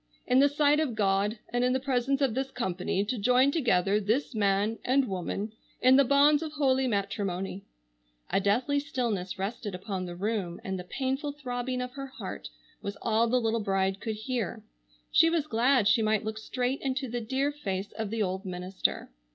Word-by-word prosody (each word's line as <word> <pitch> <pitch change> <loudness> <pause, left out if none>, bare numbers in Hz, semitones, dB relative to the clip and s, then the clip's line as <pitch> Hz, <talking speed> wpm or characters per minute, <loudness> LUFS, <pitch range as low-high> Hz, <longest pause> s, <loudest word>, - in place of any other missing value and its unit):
—"in 250 - +4
the 285 +1 +6
sight 295 +1 +3
of 285 -7 -1
God 200 +1 +1 0.2
and 245 0 +2
in 250 0 +3
the 260 - +1
presence 270 +1 0
of 265 -5 +2
this 265 +2 -2
company 190 -4 -1
to 240 +2 -2
join 250 +5 +4
together 205 - +2
this 225 +8 0
man 205 +1 +1
and 265 +1 +2
woman 195 +2 -3 0.3
in 255 +1 +6
the 280 - +7
bonds 285 +3 +5
of 315 -2 -5
holy 265 -3 +2
matrimony;"—a 185 - -4
deathly 245 +9 +1
stillness 240 - -2
rested 205 +1 -4
upon 185 -1 -4
the 175 - -6
room 195 -2 -2
and 190 -1 -3
the - - -5
painful 270 - -2
throbbing 250 -2 -3
of 250 - -6
her 275 +1 -6
heart 265 - -7 0.3
was 200 0 -5
all 225 +1 +2
the 250 +2 +2
little 225 -1 0
bride 195 -2 0
could 220 0 -3
hear. 225 -1 -3 0.5
She 330 - +6
was 330 -3 +1
glad 245 -3 +3
she 225 +2 +4
might 215 0 +1
look 220 0 -3
straight 250 +4 -2
into 265 0 -2
the 240 0 -3
dear 265 +5 0
face 200 -9 -4
of 220 -2 -4
the 220 0 0
old 190 0 -2
minister. 185 - -2
225 Hz, 185 wpm, -29 LUFS, 195-265 Hz, 0.5 s, the